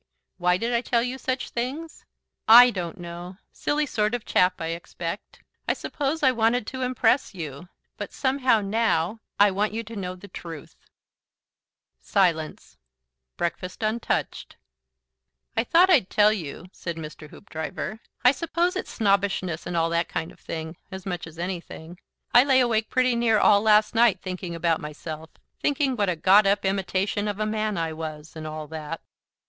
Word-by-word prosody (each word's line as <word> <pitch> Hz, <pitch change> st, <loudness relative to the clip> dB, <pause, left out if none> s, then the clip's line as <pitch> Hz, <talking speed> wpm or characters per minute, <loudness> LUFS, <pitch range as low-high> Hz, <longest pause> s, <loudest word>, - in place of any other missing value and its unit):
"Why 180 Hz, 0 st, +3 dB
did 230 Hz, +4 st, -2 dB
I 235 Hz, -, +2 dB
tell 235 Hz, -1 st, +1 dB
you 255 Hz, +2 st, -4 dB
such 260 Hz, 0 st, -3 dB
things? 275 Hz, +7 st, -5 dB, 0.4 s
I 245 Hz, +2 st, +10 dB
don't 180 Hz, -2 st, -5 dB
know. 175 Hz, +1 st, -8 dB
Silly 300 Hz, +1 st, 0 dB
sort 215 Hz, -4 st, 0 dB
of 240 Hz, -, -6 dB
chap, 180 Hz, 0 st, +2 dB
I 165 Hz, -, -3 dB
expect. 170 Hz, +2 st, -6 dB, 0.2 s
I -, -, +3 dB
suppose 295 Hz, +1 st, -3 dB
I 260 Hz, -, +6 dB
wanted 230 Hz, -1 st, +1 dB
to 260 Hz, +3 st, -6 dB
impress 255 Hz, -2 st, +1 dB
you. 155 Hz, 0 st, -7 dB, 0.3 s
But -, -, -6 dB
somehow, 260 Hz, -4 st, +2 dB
now, 205 Hz, -2 st, 0 dB, 0.2 s
I 205 Hz, 0 st, +6 dB
want 205 Hz, +3 st, 0 dB
you 230 Hz, +1 st, -3 dB
to 225 Hz, +1 st, -10 dB
know 185 Hz, -3 st, -4 dB
the 185 Hz, +2 st, -12 dB
truth." 165 Hz, -4 st, -9 dB, 1.2 s
Silence. 170 Hz, -6 st, 0 dB, 0.6 s
Breakfast 180 Hz, +4 st, -3 dB
untouched. 220 Hz, +2 st, -2 dB, 1.0 s
"I 225 Hz, -, +2 dB
thought 350 Hz, +9 st, +5 dB
I'd 255 Hz, -, +4 dB
tell 210 Hz, 0 st, +4 dB
you," 170 Hz, -4 st, -6 dB
said 170 Hz, -3 st, -6 dB
Mr. 155 Hz, -1 st, -9 dB
Hoopdriver. 160 Hz, +5 st, -6 dB, 0.3 s
"I 250 Hz, -, +9 dB
suppose 340 Hz, +5 st, -1 dB
it's 375 Hz, -, -4 dB
snobbishness 195 Hz, -5 st, 0 dB
and 175 Hz, -, -2 dB
all 165 Hz, 0 st, +1 dB
that 170 Hz, 0 st, 0 dB
kind 160 Hz, -, -3 dB
of -, -, -19 dB
thing, 160 Hz, 0 st, -6 dB
as 190 Hz, -2 st, -8 dB
much 175 Hz, -3 st, -4 dB
as 165 Hz, 0 st, -13 dB
anything. 175 Hz, -1 st, -6 dB, 0.3 s
I 245 Hz, -, +8 dB
lay 265 Hz, -2 st, +4 dB
awake 225 Hz, -3 st, +1 dB
pretty 255 Hz, -1 st, +2 dB
near 235 Hz, -2 st, +3 dB
all 205 Hz, -1 st, +5 dB
last 215 Hz, 0 st, +4 dB
night 225 Hz, -5 st, +4 dB
thinking 185 Hz, -2 st, -5 dB
about 165 Hz, -1 st, +1 dB
myself; 155 Hz, +1 st, -7 dB, 0.3 s
thinking 280 Hz, -2 st, +1 dB
what 205 Hz, -4 st, +1 dB
a 180 Hz, -, 0 dB
got 195 Hz, +5 st, +5 dB
up 200 Hz, 0 st, +2 dB
imitation 195 Hz, +1 st, 0 dB
of 205 Hz, 0 st, -3 dB
a 215 Hz, -, +1 dB
man 215 Hz, -1 st, -1 dB
I 165 Hz, -1 st, -1 dB
was, 155 Hz, -1 st, -7 dB
and 155 Hz, -1 st, -6 dB
all 155 Hz, 0 st, -5 dB
that." 160 Hz, 0 st, -5 dB
200 Hz, 170 wpm, -25 LUFS, 170-235 Hz, 1.2 s, I